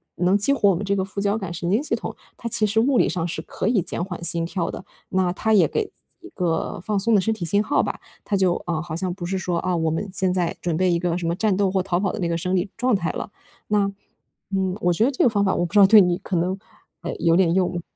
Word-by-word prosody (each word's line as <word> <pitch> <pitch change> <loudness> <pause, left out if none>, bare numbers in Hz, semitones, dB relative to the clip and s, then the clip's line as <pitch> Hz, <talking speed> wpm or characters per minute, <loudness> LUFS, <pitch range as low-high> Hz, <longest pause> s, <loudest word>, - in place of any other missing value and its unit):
能 180 +3 +2
激 210 +8 +3
活 210 -7 +3
我 190 - +3
们 185 - -4
这 200 - +1
个 190 - 0
副 195 +1 -7
交 205 +2 +1
感 190 -5 -5
神 170 0 -3
经 220 - +2
系 - - 0
统， - - -6 0.2
它 235 - -6
其 215 - +2
实 215 +2 +1
物 255 +2 +3
理 - - +4
上 170 -2 -2
是 170 - -4
可 - - -4
以 225 -4 +3
减 170 - -2
缓 180 -2 -6
心 170 0 +2
跳 170 0 -2
的。 - - -8 0.2
那 185 -1 +1
它 220 +4 0
也 195 -5 +5
给 445 - -1
自 - - -26 0.3
己 - - -11
一 - - -14
个 170 -3 -1
放 205 +1 -1
松 225 +2 +2
的 200 - +4
身 220 +4 0
体 190 -6 -5
信 200 +5 +2
号 285 - +2
吧。 - - -4 0.3
它 205 - 0
就 185 -2 +2
啊， 165 -3 -2
好 170 -1 -6
像 180 +1 -2
不 175 -1 -7
是 190 +2 -2
说 180 -2 -2
啊， 185 -1 -1
我 160 -1 0
们 165 +6 -2
现 190 -2 +2
在 175 -2 -1
准 170 -2 -1
备 185 0 +2
一 170 - +1
个 175 -1 -1
什 175 - -4
么 165 - +1
战 210 -1 +1
斗 195 -1 +1
或 190 - +1
逃 180 -1 -1
跑 195 -2 0
的 220 - -6
那 175 - 0
个 170 0 -1
生 180 +3 -1
理 185 +2 0
状 250 +1 +1
态 170 -4 -1
了。 - - -6 0.4
那， 205 -1 +2 0.7
嗯， 190 -1 0
我 175 0 +2
觉 215 +7 +2
得 265 - +3
这 255 - 0
个 - - +5
方 205 -3 +1
法 190 - +1
我 175 - 0
不 170 - -7
知 210 - +5
道 195 - +8
对 215 0 +8
你 180 -2 +2
可 195 -2 -4
能 180 +3 0 0.4
呃， - - -4
有 165 -1 +3
点 175 -3 +3
用。 180 -1 0
185 Hz, 325 characters per minute, -23 LUFS, 175-205 Hz, 0.7 s, 道